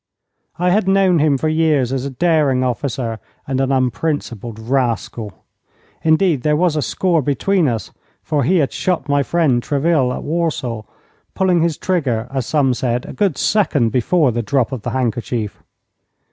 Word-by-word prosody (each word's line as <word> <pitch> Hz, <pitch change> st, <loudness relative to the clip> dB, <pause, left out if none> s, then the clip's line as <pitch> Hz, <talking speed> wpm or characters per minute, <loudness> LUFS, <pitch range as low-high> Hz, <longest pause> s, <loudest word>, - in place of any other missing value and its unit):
I 180 Hz, +1 st, +1 dB
had 200 Hz, 0 st, +2 dB
known 190 Hz, -3 st, +3 dB
him 150 Hz, -2 st, +3 dB
for 155 Hz, -, -1 dB
years 155 Hz, -5 st, +1 dB
as 135 Hz, 0 st, -2 dB
a -, -, -2 dB
daring 145 Hz, -3 st, +2 dB
officer 125 Hz, -2 st, -2 dB, 0.3 s
and 135 Hz, -1 st, -1 dB
an 135 Hz, 0 st, 0 dB
unprincipled 125 Hz, -4 st, -2 dB
rascal. 115 Hz, -3 st, -2 dB, 0.6 s
Indeed, 160 Hz, -2 st, +2 dB
there 150 Hz, +2 st, +2 dB
was 170 Hz, 0 st, +1 dB
a 150 Hz, -, 0 dB
score 170 Hz, +5 st, +1 dB
between 160 Hz, +5 st, +1 dB
us, 115 Hz, -3 st, -3 dB, 0.3 s
for 150 Hz, -3 st, 0 dB
he 180 Hz, +9 st, +2 dB
had 145 Hz, -5 st, +1 dB
shot 180 Hz, -4 st, -1 dB
my 145 Hz, 0 st, +2 dB
friend, 140 Hz, -5 st, +1 dB
Treville, 145 Hz, -1 st, +1 dB
at -, -, -5 dB
Warsaw, 150 Hz, -8 st, -2 dB, 0.5 s
pulling 180 Hz, -3 st, +2 dB
his 165 Hz, -1 st, 0 dB
trigger, 130 Hz, -11 st, -1 dB
as 135 Hz, -4 st, -2 dB
some 140 Hz, -4 st, +2 dB
said, 120 Hz, 0 st, -2 dB
a -, -, -8 dB
good 195 Hz, -9 st, 0 dB
second 150 Hz, -, +2 dB
before 130 Hz, +4 st, +2 dB
the 120 Hz, +1 st, -1 dB
drop 130 Hz, +1 st, 0 dB
of 130 Hz, -4 st, -4 dB
the -, -, -3 dB
handkerchief. 120 Hz, -3 st, -2 dB
140 Hz, 165 wpm, -18 LUFS, 125-165 Hz, 0.6 s, known